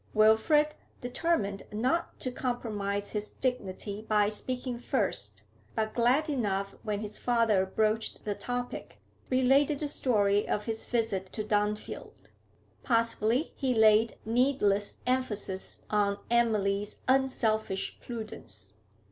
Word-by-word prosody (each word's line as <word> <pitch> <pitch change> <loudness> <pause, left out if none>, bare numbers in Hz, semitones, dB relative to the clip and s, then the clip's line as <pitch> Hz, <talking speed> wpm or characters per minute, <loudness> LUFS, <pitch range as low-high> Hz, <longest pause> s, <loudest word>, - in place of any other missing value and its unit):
Wilfrid, 220 +9 +4 0.3
determined 245 - 0
not 255 +11 -1
to 255 - -1
compromise 210 -6 -2
his 210 0 -3
dignity 210 -5 -3
by 210 -1 +2
speaking 250 +3 -4
first, - - -1 0.3
but 220 -1 -1
glad 250 +6 +3
enough 200 -9 -1
when 210 -2 -2
his 210 -1 -6
father 225 -6 +2
broached 215 +3 0
the 210 - 0
topic, 245 +3 -5 0.3
related 270 +3 +4
the 300 - -1
story 205 -7 +2
of 210 - -1
his 225 -1 -3
visit 215 -6 -1
to 215 - -2
Dunfield. 210 0 -2 0.5
Possibly 230 +3 +1
he 260 -3 0
laid 220 0 +5
needless 225 -4 +2
emphasis 215 -7 -2
on 205 -1 +2
Emily's 210 -3 +1
unselfish 225 -7 +1
prudence. 215 - -8
220 Hz, 115 wpm, -30 LUFS, 205-250 Hz, 0.5 s, laid